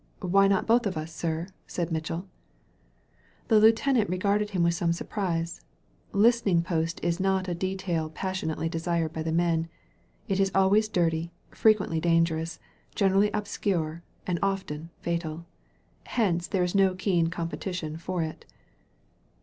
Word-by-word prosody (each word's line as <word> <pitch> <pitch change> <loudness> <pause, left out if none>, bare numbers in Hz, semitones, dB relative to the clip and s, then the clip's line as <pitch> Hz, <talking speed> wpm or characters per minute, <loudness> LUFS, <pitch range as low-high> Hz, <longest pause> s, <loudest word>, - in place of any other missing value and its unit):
"Why 195 +1 +4
not 195 -1 +2
both 230 0 +3
of 185 - -3
us, 155 +1 -5
sir?" 165 0 -2 0.2
said 175 -1 -3
Mitchell. 165 +3 -3 1.2
The 220 - +6
lieutenant 225 0 +4
regarded 200 +3 +1
him 185 -4 0
with 170 0 +3
some 170 -1 +1
surprise. 170 -2 -3 0.5
Listening 205 -5 +3
post 165 -1 -1
is 170 +1 0
not 190 0 +1
a 175 - -1
detail 180 -3 -2
passionately 165 -2 -3
desired 165 -1 -1
by 160 - -3
the 160 0 -2
men. 165 -1 +1 0.6
It 195 0 0
is 195 0 +2
always 200 +3 +4
dirty, 170 -3 0 0.2
frequently 210 -7 +3
dan 165 0 +4
gerous, 160 0 -4 0.4
generally 195 +1 +3
obscure, 185 -6 -2 0.2
and 175 -2 -1
often 190 -5 -2
fatal. 170 -1 -3 0.6
Hence 175 -7 0
there 190 -3 +1
is 180 - -1
no 195 -2 +3
keen 180 -3 +1
competition 170 -1 -4
for 170 +1 -2
it. 160 0 -8
175 Hz, 140 wpm, -27 LUFS, 165-195 Hz, 1.2 s, The